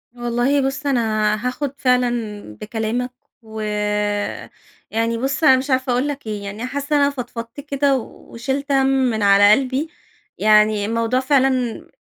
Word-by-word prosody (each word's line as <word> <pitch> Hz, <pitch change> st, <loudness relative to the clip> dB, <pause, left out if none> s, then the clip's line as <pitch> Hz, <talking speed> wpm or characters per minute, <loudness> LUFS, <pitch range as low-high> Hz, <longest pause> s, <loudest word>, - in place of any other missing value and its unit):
والله 240 Hz, +4 st, +1 dB
بُص 270 Hz, +2 st, -3 dB
أنا 215 Hz, -5 st, +1 dB
هاخد 275 Hz, +2 st, -3 dB
فعلًا 250 Hz, -1 st, +3 dB, 0.5 s
بكلامَك، 230 Hz, +3 st, -3 dB, 0.3 s
و 220 Hz, -1 st, -9 dB, 1.3 s
يعني 230 Hz, +1 st, 0 dB
بُصّ 265 Hz, +4 st, -2 dB
أنا 265 Hz, -4 st, +7 dB
مش 265 Hz, +2 st, -4 dB
عارفة 260 Hz, -1 st, +1 dB
أقول 250 Hz, +3 st, +1 dB
لَك 285 Hz, -4 st, -5 dB
إيه، 210 Hz, -1 st, -4 dB
يعني 205 Hz, +4 st, -5 dB
حاسّة 285 Hz, +3 st, -2 dB
أنا 285 Hz, 0 st, +4 dB
فضفضت 245 Hz, -2 st, -7 dB
كده 280 Hz, -1 st, +1 dB
وشلت 265 Hz, +4 st, -5 dB
هَم 270 Hz, -1 st, +3 dB
مِن 255 Hz, -5 st, +1 dB
على 200 Hz, +1 st, +6 dB
قلبي، 265 Hz, +6 st, +1 dB, 0.5 s
يعني 215 Hz, -1 st, +4 dB
الموضوع 230 Hz, +3 st, 0 dB
فعلًا 265 Hz, 0 st, +3 dB
م 250 Hz, -3 st, -2 dB
250 Hz, 145 wpm, -20 LUFS, 225-270 Hz, 1.3 s, أنا